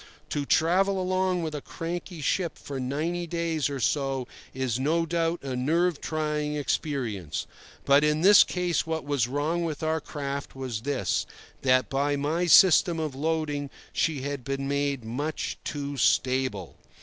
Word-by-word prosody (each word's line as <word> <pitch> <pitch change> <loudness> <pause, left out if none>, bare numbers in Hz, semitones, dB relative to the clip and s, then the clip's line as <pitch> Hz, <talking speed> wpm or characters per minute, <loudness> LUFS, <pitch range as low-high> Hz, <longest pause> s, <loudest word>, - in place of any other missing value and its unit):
To 145 -1 -2
travel 190 +4 +3
along 185 -1 0
with 155 -1 -3
a 150 - -4
cranky 170 +1 -6
ship 170 +4 0
for 140 -2 -6
ninety 160 +7 -2
days 165 -3 -1
or 140 -1 -4
so 135 0 0 0.2
is 130 -2 -2
no 165 +5 +1
doubt 165 0 -1
a 135 -2 -3
nerve 165 +6 +1
trying 150 -1 -2
experience; 125 - -2 0.4
but 140 +1 +5
in 150 +1 +2
this 205 +3 +8
case 180 -2 -1
what 160 0 -2
was 140 -5 +1
wrong 150 +6 -1
with 160 -2 -4
our 160 0 0
craft 140 -2 -5
was 130 -5 -4
this: 140 +1 -1 0.3
that 130 -1 +3
by 140 +1 0
my 155 +5 0
system 175 -1 +6
of 155 -3 -2
loading 150 -1 -1 0.2
she 150 -5 0
had 140 -2 -4
been 135 +1 -3
made 140 -3 -1
much 145 +7 -3
too 145 -1 -4
stable. 130 -6 +1
150 Hz, 155 wpm, -27 LUFS, 135-165 Hz, 0.4 s, this